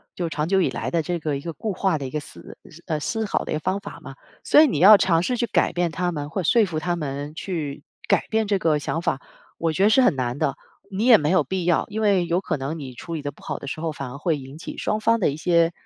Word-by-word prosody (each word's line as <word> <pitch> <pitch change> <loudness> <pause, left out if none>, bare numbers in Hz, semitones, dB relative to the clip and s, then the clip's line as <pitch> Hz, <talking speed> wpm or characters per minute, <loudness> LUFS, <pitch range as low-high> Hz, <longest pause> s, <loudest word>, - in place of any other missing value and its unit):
就 175 -2 -2
长 155 -1 -2
久 190 +1 +3
以 - - +2
来 - - -4
的 170 - +1
这 170 +2 -3
个 150 -3 -2
一 - - -8
个 165 - -5
固 210 +7 -4
化 190 -2 +1
的 140 - -5
一 - - -9
个 150 - -2
思 - - -12 0.3
呃， 155 -2 -1
思 225 +8 -2
考 205 - -1
的 - - -6
一 - - 0
个 - - -2
方 185 +5 -1
法 - - -9
嘛。 - - -10 0.3
所 300 - +6
以 315 - +6
你 215 - -1
要 200 +5 +10
尝 170 -3 +2
试 250 +8 -1
去 235 - +1
改 - - +1
变 175 -1 0
他 180 +1 -1
们 145 -2 -4
或 185 +4 -3
说 225 +6 +4
服 165 -5 -3
他 175 +2 -1
们 145 -1 -5
去 155 -6 -4 0.2
改 - - +2
变 220 -1 +1
这 200 -1 +2
个 160 -5 +1
想 160 +3 -3
法 - - -1 0.4
我 165 -1 0
觉 190 - +1
得 205 - +6
是 240 +5 +5
很 190 - +4
难 125 0 -2
的。 135 - 0 0.4
你 205 +4 -1
也 245 -3 +8
没 150 0 -1
有 185 - +4
必 190 -1 -2
要， 175 -2 +2
因 220 0 -4
为 200 -4 +3
有 170 +2 0
可 160 -5 -2
能 140 +4 -4
你 135 -4 -7
处 165 +7 -8
理 155 - -4
得 145 0 -4
不 - - -21
好 - - -4
的 - - -9
时 140 - -5
候， 160 -1 -2
反 135 -4 -6
而 140 - -8
会 155 +1 0
引 135 +1 -10
起 165 - -8
双 215 - -1
方 230 +1 +2
的 - - +3
一 140 - -4
些， 170 0 +3
170 Hz, 320 characters per minute, -23 LUFS, 150-190 Hz, 0.4 s, 要